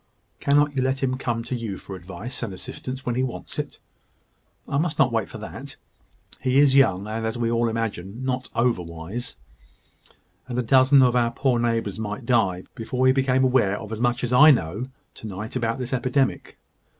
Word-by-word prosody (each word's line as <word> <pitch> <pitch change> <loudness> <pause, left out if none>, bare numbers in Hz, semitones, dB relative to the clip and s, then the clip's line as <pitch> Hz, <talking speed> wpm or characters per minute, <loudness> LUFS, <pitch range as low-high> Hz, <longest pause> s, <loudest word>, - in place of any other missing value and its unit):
"Cannot 145 0 +3
you 130 - +1
let 130 +1 0
him 130 -1 +1
come 120 -3 -2
to 120 +2 -3
you 115 -5 -4
for 95 - -9
advice 95 +7 -7
and 115 -4 -3
assistance 130 +7 -7
when 120 - 0
he 125 - 0
wants 130 -2 -5
it?" - - -5 0.9
"I 140 - 0
must 160 -1 -1
not 130 -2 +4
wait 115 -3 -1
for - - -8
that. - - -8 0.7
He 130 +1 +2
is 140 -1 +6
young, 100 -9 +4
and, 110 +1 -4
as 110 +1 -2
we 115 -1 0
all 115 0 +2
imagine, 115 0 -4
not 130 0 -2
over 120 -5 +2
wise: 85 +9 -7 1.1
and 125 -2 -4
a 125 - +1
dozen 130 +3 +6
of 125 -1 +3
our 120 -1 +3
poor 125 0 +1
neighbours 115 -4 -1
might 105 +2 -4
die 100 -7 +2
before 125 +3 -1
he 130 - +6
became 130 -1 +2
aware 125 -6 +3
of 110 - -9
as 110 - -4
much 120 +1 0
as 125 0 -1
I 150 +5 +8
know 105 - +1 0.3
to 110 - -9
night 105 +4 -6
about 115 -1 0
this 125 0 -4
epidemic. 130 +1 0
120 Hz, 200 wpm, -24 LUFS, 110-130 Hz, 1.1 s, I